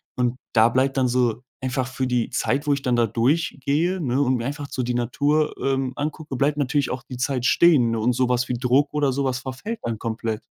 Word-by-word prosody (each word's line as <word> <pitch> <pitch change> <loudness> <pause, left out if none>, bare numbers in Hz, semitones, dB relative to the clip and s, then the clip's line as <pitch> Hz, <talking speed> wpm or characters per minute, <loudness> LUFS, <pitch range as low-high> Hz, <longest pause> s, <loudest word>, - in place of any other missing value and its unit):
Und 125 0 0 0.2
da 115 0 +5
bleibt 130 +3 +1
dann 130 -1 +3
so, 120 -1 0 0.2
einfach 130 0 -1
für 130 +1 -3
die 125 -2 0
Zeit, 145 +2 -1
wo 145 - +4
ich 140 - -2
dann 125 -1 +1
da 120 -1 +3
durch 130 +11 0
gehe, 165 +8 +1
ne, 135 -5 0
und 130 -2 +2
mir 120 -1 -3
einfach 145 +1 -4
so 130 - -3
die 125 0 -1
Natur, 145 +6 +1
ähm, 135 -1 0
angucke, 150 -1 -4
bleibt 140 +3 +1
natürlich 145 -1 0
auch 130 - -4
die 125 - -6
Zeit 125 0 -1
stehen. 135 -10 +4
Und 115 +3 +1
so 125 +1 +1
was 125 0 +1
wie - - -2
Druck 125 +4 +1
oder 145 -2 +1
so 140 +2 -1
was 130 -1 -1
verfällt 135 - -6
dann 115 -1 -2
komplett. 110 -1 -3
130 Hz, 235 wpm, -23 LUFS, 120-145 Hz, 0.2 s, da